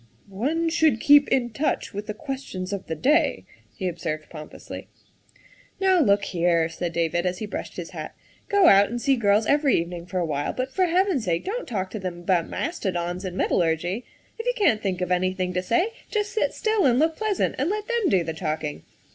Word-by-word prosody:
" - - -34 0.2
One 330 +2 0
should 315 -7 +3
keep 290 +2 +6
in 245 -3 +1
touch 280 +8 -1
with 205 +1 -5
the 210 - -4
questions 260 -9 -5
of 200 - -5
the 160 - -3
day, 300 - +2
' - - -30
' - - -35
he 190 - -2
observed 165 -3 -4
pompously. 155 -2 -9 0.5
" - - -29
Now 380 -2 +4
look 200 -8 +3
here," 170 -3 +1
said 170 +1 -4
David 170 +1 0
as 180 0 -2
he 215 - -4
brushed 205 - -6
his - - -6
hat, - - -7 0.2
" - - -34
go 405 -2 +4
out 200 - +7
and 240 +2 -3
see 275 +2 +2
girls 210 -2 +3
every 285 0 +3
evening 170 +1 -5
for 185 - -4
a 175 - +1
while, 145 -2 -2
but 255 +1 -3
for 370 -1 +2
Heaven's 355 - +1
sake 170 -2 -1
don't 470 +6 -3
talk 190 -6 -3
to 215 - -5
them 180 -2 -5
about 175 -1 +1
mastodons 180 - -3
and 185 -1 -5
metallurgy. 175 +7 0 0.4
If 455 - -4
you - - +3
can't 235 - +3
think 185 -3 -2
of 180 0 -2
anything 185 0 0
to 180 - 0
say, 290 - +1 0.2
just 420 -1 -1
sit 445 - 0
still 435 - +2
and 245 -1 +3
look 320 +3 +2
pleasant 430 -1 0
and 285 +6 +1
let 420 +1 -2
them 470 -4 +1
do 185 -3 +3
the 160 0 -4
talking. 155 - -3
205 Hz, 220 wpm, -24 LUFS, -, 0.5 s, out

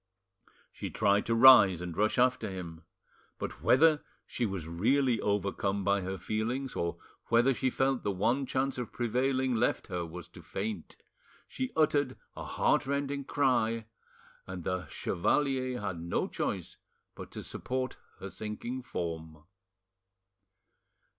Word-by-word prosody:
She - - -6
tried 100 -1 +2
to 115 - +2
rise 115 -8 +8
and 90 -2 -5
rush 105 +2 +1
after 125 -3 +2
him, 85 -4 -7 0.6
but - - -6
whether 155 +3 +5 0.2
she 120 - -2
was 95 -5 -5
really 120 +9 +2
overcome 100 0 0
by 100 0 +2
her 95 +1 -4
feelings, 120 +7 -2
or 85 0 -2 0.3
whether 120 +3 +4
she 130 +1 0
felt 130 0 +1
the - - -1
one 120 +8 +1
chance 130 0 -1
of 125 - -4
prevailing 130 +2 0
left 110 - 0
her 90 -2 -2
was 85 0 -8
to - - -13
faint, 100 -4 -5 0.5
she 260 0 -4
uttered 145 -4 +2 0.2
a - - -6
heartrending 140 0 0
cry, 120 -6 +1 0.6
and 95 -2 -6
the 90 -2 -2
chevalier 130 - 0
had 95 -4 -4
no 85 0 -1
choice - - -3 0.4
but - - -9
to - - -6
support 130 0 -3 0.2
her - - -7
sinking 115 +4 -5
form. 80 -8 -5
115 Hz, 135 wpm, -31 LUFS, 95-130 Hz, 0.6 s, rise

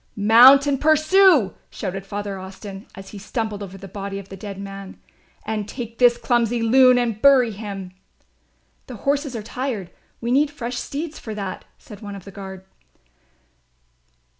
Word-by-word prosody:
"Mount 240 +7 +7
and 280 -2 0
pursue," 310 - +4 0.2
shouted 195 +1 -6
Father 200 -1 -5
Austin, 195 +1 -10
as 195 0 -10
he 205 - -9
stumbled 215 0 -4
over 195 -1 -8
the 195 +1 -10
body 195 +1 -6
of 200 -1 -9
the 195 - -8
dead 195 0 -8
man, 195 -1 -9 0.5
"and 215 -2 -3
take 230 -3 -7
this 240 -1 +5
clumsy 240 -1 +1
loon 255 +2 +5
and 230 -3 -1
bury 265 -4 +5
him." 195 -3 -7 1.0
"The 250 - -8
horses 280 -2 0
are 220 - -5
tired, 230 -6 -4 0.3
we 235 +1 -3
need 285 +3 +3
fresh 245 -4 -6
steeds 310 +2 -5
for 220 -2 -7
that," 195 -3 -6
said 210 -2 -13
one 205 -2 -7
of 195 - -11
the 200 - -10
guard. 190 -1 -9
220 Hz, 165 wpm, -22 LUFS, 195-255 Hz, 1.0 s, Mount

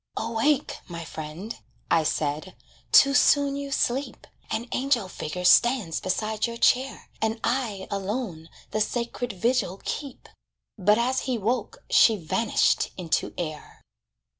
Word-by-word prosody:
"Awake, 235 +6 0
my 170 -2 -7
friend," 160 +8 -7 0.3
I 165 - +5
said, 150 +5 -2 0.4
"too 275 -1 +7
soon 285 -1 +4
you 280 0 -5
sleep; 270 0 -1 0.2
An 235 +2 -2
angel 255 -6 +1
figure 180 0 -5
stands 235 -5 +4
beside 215 +4 -1
your 235 0 -6
chair, 260 +3 +1
And 220 +1 0
I 230 -6 -1
alone 195 -4 -4 0.2
the 215 - 0
sacred 240 +2 -2
vigil 200 -1 0
keep." 280 -4 -5 0.5
But 210 +1 +3
as 255 +2 +1
he 250 - +1
woke, 225 +1 -2
she 225 - +6
vanished 210 +6 +1
into 170 -4 -1
air. 155 -3 -6
220 Hz, 130 wpm, -26 LUFS, 185-250 Hz, 0.5 s, too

